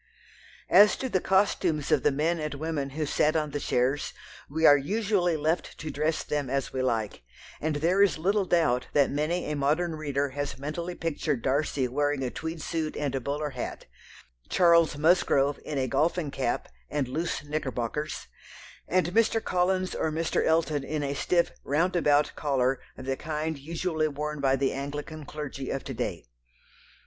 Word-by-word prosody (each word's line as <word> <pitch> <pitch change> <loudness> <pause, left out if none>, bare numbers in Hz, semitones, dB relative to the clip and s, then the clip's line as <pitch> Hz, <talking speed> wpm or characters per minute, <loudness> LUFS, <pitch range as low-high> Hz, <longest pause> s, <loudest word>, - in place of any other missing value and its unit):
As 210 +1 +7
to 260 - -3
the 190 - +2
costumes 185 -6 +1
of - - +4
the - - +3
men 160 +5 0
and 150 -1 -3
women 145 -2 -2
who 150 +3 -3
sat 150 +2 +2
on 155 -2 0
the 145 - -2
chairs, 130 +2 0 0.4
we 160 +3 +1
are 145 - +9
usually 185 +2 +1
left 155 +3 -1
to 155 -1 -5
dress 155 +3 0
them 145 -3 -2
as 135 0 -2
we 130 - -1
like, 115 - -1 0.4
and 155 0 0
there 170 +6 +2
is 200 -4 +4
little 195 +5 +1
doubt 155 -9 +2
that 140 -2 +3
many 155 +5 -1
a - - -1
modern 155 +5 +1
reader 145 -2 -1
has 145 +1 -4
mentally 170 +6 -4
pictured 150 -5 -2
Darcy 140 -1 +1
wearing 145 +2 0
a 125 - -2
tweed 160 -1 -5
suit 160 -2 -2
and 145 -3 -1
a 135 - -1
bowler 145 +3 -2
hat, 125 -2 -6 0.6
Charles 170 -4 +4
Musgrove 145 -3 +3
in 150 - -4
a 130 -1 +1
golfing 150 +3 0
cap 130 -3 -1 0.2
and 145 -3 -1
loose 155 +4 -2
knickerbockers, 145 -1 -3 0.6
and 180 -1 +1
Mr. 225 +1 +3
Collins 185 -1 0
or 160 - 0
Mr. 160 +1 0
Elton 160 -3 +1
in 150 0 -2
a 140 0 -1
stiff 170 +4 +1
"round 165 +6 +1
about" 150 -3 +3
collar 135 -3 0 0.2
of 130 - -8
the 135 0 0
kind 155 +1 -3
usually 160 +1 -1
worn 150 +1 -4
by 135 -1 +3
the 135 0 +1
Anglican 145 +3 -5
clergy 140 -3 -6
of 135 - -3
to - - -5
day. - - -4
150 Hz, 175 wpm, -28 LUFS, 140-165 Hz, 0.6 s, are